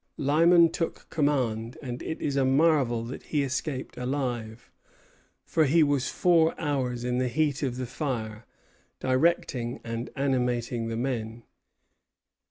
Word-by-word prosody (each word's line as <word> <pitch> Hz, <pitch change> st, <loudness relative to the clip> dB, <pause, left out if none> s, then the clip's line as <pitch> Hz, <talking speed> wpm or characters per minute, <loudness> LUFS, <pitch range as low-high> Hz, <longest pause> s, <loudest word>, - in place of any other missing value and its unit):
Lyman 165 Hz, +4 st, +5 dB
took 165 Hz, -, -4 dB
command; 125 Hz, -6 st, 0 dB
and 125 Hz, -3 st, -6 dB
it 160 Hz, -, -4 dB
is 140 Hz, -, -2 dB
a 135 Hz, -, +3 dB
marvel 135 Hz, -4 st, +3 dB
that 120 Hz, +3 st, -7 dB
he 150 Hz, -2 st, -1 dB
escaped 130 Hz, 0 st, -3 dB
alive, 125 Hz, -3 st, -3 dB, 0.7 s
for 160 Hz, -, +2 dB
he 160 Hz, +3 st, +4 dB
was 145 Hz, -3 st, +1 dB
four 165 Hz, -2 st, +3 dB
hours 130 Hz, -5 st, -1 dB
in 125 Hz, 0 st, 0 dB
the 130 Hz, -, +1 dB
heat 145 Hz, +2 st, 0 dB
of 130 Hz, -4 st, -2 dB
the 130 Hz, -, -3 dB
fire, 115 Hz, -5 st, -4 dB, 0.5 s
directing 130 Hz, -3 st, 0 dB
and 115 Hz, +1 st, -4 dB
animating 125 Hz, -3 st, 0 dB
the 115 Hz, 0 st, -3 dB
men. 115 Hz, -2 st, -3 dB
130 Hz, 135 wpm, -27 LUFS, 120-145 Hz, 0.7 s, Lyman